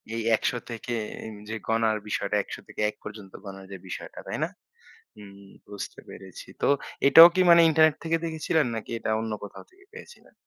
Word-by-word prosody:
এই 115 Hz, -, -2 dB
১০০ -, -, -1 dB, 0.2 s
থেকে 120 Hz, +1 st, -6 dB, 0.3 s
এন 110 Hz, -, -8 dB, 0.2 s
যে 110 Hz, -, -3 dB
গণার 115 Hz, -1 st, +1 dB
বিষয়টা, 105 Hz, 0 st, -2 dB
১০০ 100 Hz, -, -5 dB
থেকে -, -, -7 dB
১ 105 Hz, -, -9 dB
পর্যন্ত 105 Hz, -3 st, -10 dB
গণার 95 Hz, 0 st, -9 dB
যে 95 Hz, -, -7 dB
বিষয়টা। 90 Hz, -, -8 dB
তাই -, -, -4 dB
না? -, -, 0 dB, 0.7 s
হুম 100 Hz, -2 st, -13 dB, 0.3 s
বুঝতে 100 Hz, -1 st, -8 dB
পেরেছি। 95 Hz, -2 st, -11 dB
তো -, -, +1 dB, 0.4 s
এটাও 165 Hz, +4 st, +11 dB
কী 185 Hz, -, +3 dB
মানে 170 Hz, 0 st, +8 dB
ইন্টারনেট 155 Hz, -1 st, +4 dB
থেকে 165 Hz, 0 st, 0 dB
দেখেছিলেন 160 Hz, -1 st, 0 dB
নাকি 110 Hz, +1 st, -7 dB
এটা 110 Hz, -, -4 dB
অন্য 110 Hz, 0 st, -4 dB
কোথাও 100 Hz, -, -10 dB
থেকে 390 Hz, +1 st, -23 dB
পেয়েছিলেন? 470 Hz, 0 st, -14 dB
110 Hz, 185 wpm, -26 LUFS, 105-160 Hz, 0.7 s, এটাও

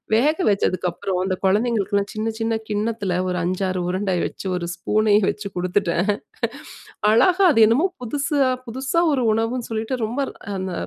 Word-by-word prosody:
வேக 295 Hz, +7 st, +3 dB
வச்சதுக்கப்புறம், 185 Hz, -1 st, -1 dB
இந்த 185 Hz, -1 st, 0 dB
கொழந்தைகளுக்கெல்லாம் 205 Hz, -1 st, +1 dB
சின்ன 220 Hz, +1 st, -2 dB
சின்ன 225 Hz, 0 st, 0 dB, 0.2 s
கிண்ணத்துல 210 Hz, -2 st, -1 dB
ஒரு 180 Hz, 0 st, -1 dB
5-6 185 Hz, +1 st, -1 dB
உருண்ட 190 Hz, +2 st, -1 dB
வச்சு, -, -, -7 dB
ஒரு 170 Hz, -, -4 dB
ஸ்பூனையும் 210 Hz, +2 st, +2 dB
வச்சு 210 Hz, -1 st, -4 dB
குடுத்துட்டேன். 180 Hz, +1 st, 0 dB, 1.0 s
அழகா 365 Hz, -, +4 dB
அது 225 Hz, -, +2 dB
என்னமோ 260 Hz, +11 st, +3 dB, 0.2 s
புதுசா 280 Hz, +2 st, +1 dB, 0.2 s
புதுசா 265 Hz, +7 st, -1 dB
ஒரு 270 Hz, -3 st, +1 dB
உணவுன்னு 225 Hz, +2 st, -1 dB
சொல்லிட்டு 225 Hz, +3 st, -2 dB
ரொம்ப 245 Hz, +6 st, -2 dB
ர் -, -, -19 dB, 0.2 s
அந்த 185 Hz, -1 st, -4 dB
215 Hz, 145 wpm, -22 LUFS, 190-240 Hz, 1.0 s, அழகா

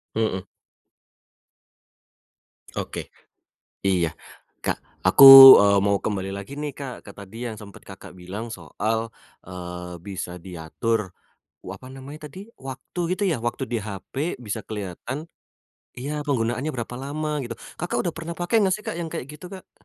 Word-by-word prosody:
Mhm. 110 Hz, -4 st, -1 dB, 2.3 s
Oke, -, -, -5 dB, 0.8 s
iya. 90 Hz, -4 st, +2 dB, 0.6 s
Kak -, -, 0 dB, 0.3 s
aku, 95 Hz, +9 st, +8 dB, 0.4 s
eee, 100 Hz, 0 st, +4 dB
mau 100 Hz, 0 st, +3 dB
kembali 95 Hz, -2 st, -3 dB
lagi 100 Hz, +7 st, -7 dB
nih 150 Hz, -2 st, -4 dB
Kak 135 Hz, -3 st, -8 dB
ke 100 Hz, -, -10 dB
tadi 105 Hz, +5 st, -9 dB
yang 115 Hz, -, -4 dB
sempet 100 Hz, -1 st, -13 dB
Kakak 95 Hz, -1 st, -12 dB
bilang 100 Hz, +6 st, -7 dB
soal, 115 Hz, 0 st, -3 dB, 0.3 s
eee, 90 Hz, -1 st, -8 dB
bisa 95 Hz, -2 st, -6 dB
diatur 95 Hz, +4 st, -3 dB, 0.5 s
wa -, -, -6 dB
apa 130 Hz, -, -13 dB
namanya 145 Hz, +3 st, -10 dB
tadi, 185 Hz, -, -11 dB, 0.2 s
waktu 135 Hz, +6 st, -8 dB, 0.2 s
gitu 205 Hz, -, -1 dB
ya, 160 Hz, -11 st, 0 dB
waktu 120 Hz, +3 st, -2 dB
di 120 Hz, -, 0 dB
HP 110 Hz, -, -5 dB
bisa 105 Hz, +2 st, -3 dB
kelihatan 110 Hz, -, -6 dB, 0.7 s
iya 145 Hz, +4 st, -4 dB
penggunaannya 125 Hz, +2 st, -1 dB
berapa 120 Hz, 0 st, -5 dB
lama 150 Hz, +2 st, -3 dB
gitu, 120 Hz, -2 st, -6 dB, 0.2 s
Kakak 175 Hz, -, -2 dB
udah 175 Hz, -, -1 dB
pernah 165 Hz, +1 st, -6 dB
pakai 175 Hz, +5 st, -1 dB
gak 185 Hz, -, +2 dB
sih 215 Hz, -, -12 dB
Kak -, -, -4 dB
yang 165 Hz, -, -3 dB
kayak -, -, -5 dB
gitu 150 Hz, +4 st, -10 dB
Kak? 190 Hz, -, -14 dB
115 Hz, 150 wpm, -24 LUFS, 100-145 Hz, 2.3 s, aku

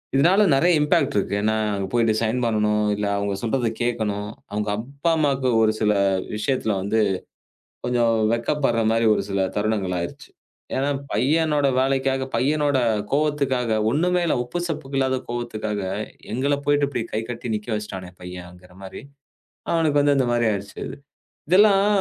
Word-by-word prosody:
இதனால 175 Hz, +9 st, +4 dB
நிறைய 170 Hz, +6 st, +3 dB
இம்பெக்ட் 150 Hz, -1 st, +2 dB
இருக்கு. 100 Hz, 0 st, 0 dB
ஏன்னா, 110 Hz, +1 st, +1 dB, 0.2 s
அங்க 100 Hz, -1 st, -3 dB
போயிட்டு 115 Hz, -2 st, +3 dB
ரிசைன் 115 Hz, +2 st, 0 dB
பண்ணனும் 105 Hz, -1 st, +1 dB
இல்ல 105 Hz, 0 st, -2 dB
அவங்க 100 Hz, 0 st, -1 dB
சொல்றதை 120 Hz, 0 st, 0 dB
கேக்கணும். 105 Hz, -4 st, -2 dB, 0.2 s
அவங்க 105 Hz, 0 st, -2 dB
அப்பா, 140 Hz, +8 st, -2 dB
அம்மாக்கு 140 Hz, -4 st, +1 dB
ஒரு 110 Hz, -1 st, +3 dB
சில 105 Hz, -1 st, +3 dB, 0.4 s
விஷயத்துல 110 Hz, -1 st, 0 dB
வந்து 100 Hz, +3 st, 0 dB, 0.9 s
கொஞ்சம் 120 Hz, -2 st, +2 dB, 0.2 s
வெட்கப்படுற 115 Hz, -1 st, 0 dB
மாரி 115 Hz, 0 st, +2 dB
ஒரு -, -, -2 dB
சில 100 Hz, 0 st, 0 dB, 0.2 s
தருணங்கள் 105 Hz, -3 st, 0 dB
ஆயிடுச்சு. 85 Hz, -, -7 dB, 0.5 s
ஏன்னா, 135 Hz, +2 st, 0 dB, 0.2 s
பையனோட 150 Hz, +5 st, +2 dB
வேலைக்காக 135 Hz, 0 st, 0 dB
பையனோட 145 Hz, 0 st, +1 dB, 0.3 s
கோபத்துக்காக, 135 Hz, -6 st, +1 dB
ஒண்ணுமே 180 Hz, +4 st, +2 dB
இல்ல, -, -, +1 dB
உப்பு 125 Hz, +8 st, -4 dB
சப்புக்கு 140 Hz, -4 st, -4 dB
இல்லாத 130 Hz, 0 st, +1 dB
கோவத்துக்காக 110 Hz, -4 st, -3 dB, 0.5 s
எங்கள 140 Hz, +4 st, +1 dB
போயிட்டு 145 Hz, 0 st, +3 dB
இப்படி 135 Hz, -4 st, -3 dB
கை 110 Hz, -, 0 dB
கட்டி 115 Hz, -1 st, -4 dB
நிக்க 105 Hz, +2 st, -9 dB
வச்சிட்டானே 95 Hz, -4 st, -5 dB
பையன்ங்கிற 90 Hz, 0 st, -10 dB
மாரி 95 Hz, -, -9 dB, 0.7 s
அவனுக்கு 155 Hz, -3 st, +2 dB
வந்து 145 Hz, 0 st, +3 dB
இந்த 130 Hz, -, +2 dB
மாரி 120 Hz, -1 st, +2 dB
ஆயிடுச்சு. 100 Hz, 0 st, -6 dB, 0.7 s
இதெல்லாம் 200 Hz, +2 st, +5 dB
120 Hz, 145 wpm, -23 LUFS, 105-145 Hz, 0.9 s, இதெல்லாம்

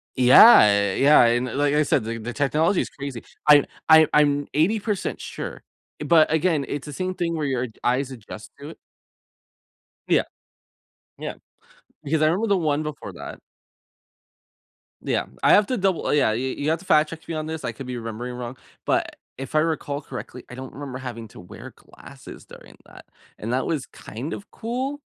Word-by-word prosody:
Yeah. 105 Hz, -, +7 dB
Yeah. 145 Hz, -1 st, +5 dB
And 120 Hz, +2 st, +2 dB
like 145 Hz, +1 st, +1 dB
I 150 Hz, -, +3 dB
said, 135 Hz, -5 st, +1 dB
the 115 Hz, +1 st, -5 dB
the 120 Hz, +2 st, -6 dB
technology 155 Hz, +7 st, +1 dB
is -, -, -5 dB
crazy. 140 Hz, -4 st, -7 dB, 0.3 s
I 145 Hz, -1 st, +7 dB, 0.2 s
I 160 Hz, 0 st, +8 dB
I'm 145 Hz, -1 st, +3 dB
80% 205 Hz, +6 st, 0 dB
sure. -, -, -7 dB, 0.4 s
But 160 Hz, 0 st, +4 dB
again, 160 Hz, -4 st, +1 dB
it's 145 Hz, +1 st, -5 dB
the 145 Hz, -, -7 dB
same 185 Hz, +5 st, -3 dB
thing 175 Hz, -2 st, -2 dB
where 150 Hz, -, -2 dB
your 130 Hz, -2 st, -1 dB, 0.2 s
eyes 130 Hz, +2 st, 0 dB
adjust 110 Hz, -3 st, -10 dB
to 145 Hz, -, -9 dB
it. 165 Hz, -, -11 dB, 1.3 s
Yeah. -, -, +3 dB, 0.9 s
Yeah. -, -, -5 dB, 0.7 s
Because 155 Hz, +2 st, 0 dB
I -, -, +5 dB
remember 185 Hz, +8 st, +1 dB
the 200 Hz, -, +3 dB
one 155 Hz, -3 st, 0 dB
before 145 Hz, -10 st, -7 dB
that. -, -, -9 dB, 1.6 s
Yeah. -, -, -1 dB, 0.2 s
I -, -, +6 dB
have 205 Hz, -1 st, +5 dB
to 255 Hz, -, -1 dB
double 190 Hz, -2 st, 0 dB
yeah. 140 Hz, -7 st, +3 dB
You 130 Hz, +4 st, -2 dB
you 145 Hz, -, -2 dB
have 160 Hz, +1 st, 0 dB
to 190 Hz, -, -15 dB
fact 155 Hz, -3 st, +3 dB
check 165 Hz, -1 st, -10 dB
me 165 Hz, -, -4 dB
on 155 Hz, 0 st, -3 dB
this. 160 Hz, 0 st, -6 dB
I -, -, -2 dB
could 135 Hz, -, -9 dB
be 125 Hz, -1 st, -5 dB
remembering 115 Hz, +2 st, -6 dB
wrong. 125 Hz, +1 st, -7 dB, 0.3 s
But -, -, 0 dB, 0.2 s
if 135 Hz, -1 st, -8 dB
I 155 Hz, -, +4 dB
recall 150 Hz, -3 st, -2 dB
correctly, 130 Hz, -2 st, -9 dB
I 125 Hz, -, -9 dB
don't 130 Hz, 0 st, -9 dB
remember 135 Hz, -2 st, -7 dB
having 120 Hz, -3 st, -7 dB
to -, -, -14 dB
wear 90 Hz, -, -11 dB
glasses -, -, -14 dB
during -, -, -15 dB
that. -, -, -15 dB, 0.3 s
And 115 Hz, +3 st, -4 dB
that 130 Hz, -, -1 dB
was 150 Hz, -5 st, -2 dB
kind 125 Hz, +9 st, -8 dB
of 205 Hz, -, -9 dB
cool. 260 Hz, +5 st, -4 dB
145 Hz, 185 wpm, -23 LUFS, 125-160 Hz, 1.6 s, I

